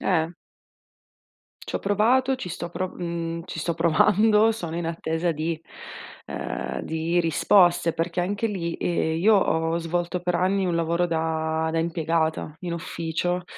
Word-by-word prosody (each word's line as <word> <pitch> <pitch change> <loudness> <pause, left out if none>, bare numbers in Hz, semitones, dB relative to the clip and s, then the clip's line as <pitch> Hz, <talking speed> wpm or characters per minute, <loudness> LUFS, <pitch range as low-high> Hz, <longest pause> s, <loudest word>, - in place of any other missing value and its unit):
Eh. 170 -2 +1 1.3
C'ho - - -3
provato, 245 +7 +2
ci 185 -8 -6
sto 170 +1 -5
pro 185 +2 -3
mhmm, 170 -1 -4
ci 160 - -7
sto 170 +2 -1
provando, 210 +7 +4
sono 170 -6 -5
in 170 - -2
attesa 165 +1 -1
di, 160 +1 -2 0.7
ehm, 65 0 -4
di 160 +2 -1
risposte 170 0 +3
perché 170 +2 -1
anche 205 +5 -1
lì, 170 -5 -3
ehm, 160 -2 0
io 210 +5 +5
ho 165 -3 +1
svolto 175 +1 -2
per 180 0 -1
anni 190 +2 +1
un 175 - 0
lavoro 170 +1 +1
da 160 -1 -1
da 165 - 0
impiegata 160 -2 -1
in 175 -2 -3
ufficio 170 +1 -2
170 Hz, 145 wpm, -25 LUFS, 165-180 Hz, 1.3 s, io